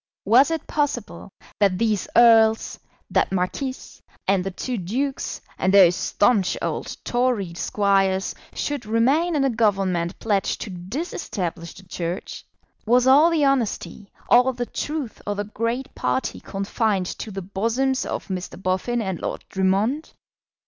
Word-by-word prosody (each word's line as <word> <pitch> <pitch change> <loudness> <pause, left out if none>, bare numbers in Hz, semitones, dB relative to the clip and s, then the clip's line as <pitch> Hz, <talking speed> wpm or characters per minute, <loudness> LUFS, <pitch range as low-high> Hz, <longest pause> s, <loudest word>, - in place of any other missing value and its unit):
Was 250 +8 +6
it 325 -2 -3
possible 270 -9 -3 0.3
that 195 -3 +3
these 215 -2 0
earls, 225 -2 +5 0.3
that - - +2
marquis, 195 +9 -1 0.5
and 190 -1 +2
the 195 - -2
two 245 +7 -4
dukes, 250 +8 -3 0.2
and 190 - +2
those 185 -3 +7
staunch 205 -2 +2
old - - -4
Tory 240 -8 0
squires, 195 +1 +1 0.2
should 285 -7 -3
remain 275 +10 +2
in 285 - +2
a 270 - +3
Government 195 -6 0
pledged 205 -4 0
to 205 - -5
disestablish 180 - -5
the 190 - -13
Church? 175 0 -5 0.4
Was 245 +2 +4
all 285 +5 +6
the 320 -4 +2
honesty, 235 -6 -1 0.2
all 250 +2 +5
the 245 0 -3
truth 290 -3 -4
of 205 -1 -2
the 205 - -1
great 230 +5 -3
party 260 - -2
confined 195 0 -1
to 215 - -6
the 195 -2 -6
bosoms 230 +8 0
of - - -4
Mr. 185 -1 -5
Boffin 190 +6 -1
and 190 -4 -4
Lord - - -4
Drummond? 200 +10 0
215 Hz, 140 wpm, -23 LUFS, 190-255 Hz, 0.5 s, those